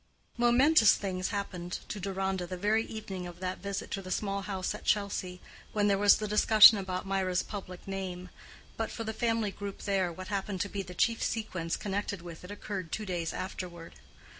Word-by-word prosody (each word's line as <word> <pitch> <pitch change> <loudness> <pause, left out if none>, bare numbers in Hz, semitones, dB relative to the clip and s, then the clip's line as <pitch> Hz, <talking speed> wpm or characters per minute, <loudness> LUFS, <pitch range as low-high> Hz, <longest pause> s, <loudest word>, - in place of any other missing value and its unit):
Momentous 240 +1 +6
things 185 -2 -2
happened 180 -3 -4
to 210 - -5
Deronda 190 -1 -2
the 185 +1 -5
very 210 +4 +2
evening 195 -5 -6
of 175 0 -10
that 185 0 -3
visit 200 -1 -4
to 195 - -2
the 185 - -9
small 200 +1 -1
house 190 -1 -3
at 210 - -8
Chelsea, 200 -3 0 0.3
when 205 -1 +2
there 200 -1 +3
was 205 0 +7
the 215 - -3
discussion 215 0 +8
about 185 -1 -3
Mirah's 190 -2 0
public 185 -3 -8
name. 185 -2 -5 0.5
But 225 - -1
for 230 - -5
the 220 0 -3
family 225 -2 0
group 200 0 -7
there, 190 -3 +1
what 185 +3 -8
appeared 200 -1 -2
to 200 - -1
be 200 - -3
the 180 -2 -9
chief 230 +5 +2
sequence 185 -7 -2
connected 200 -2 -3
with 170 -1 -9
it 180 - -10
occurred 200 -4 -5
two 215 - -3
days 175 -4 -2
afterward. 175 -3 -6
195 Hz, 190 wpm, -30 LUFS, 185-210 Hz, 0.5 s, discussion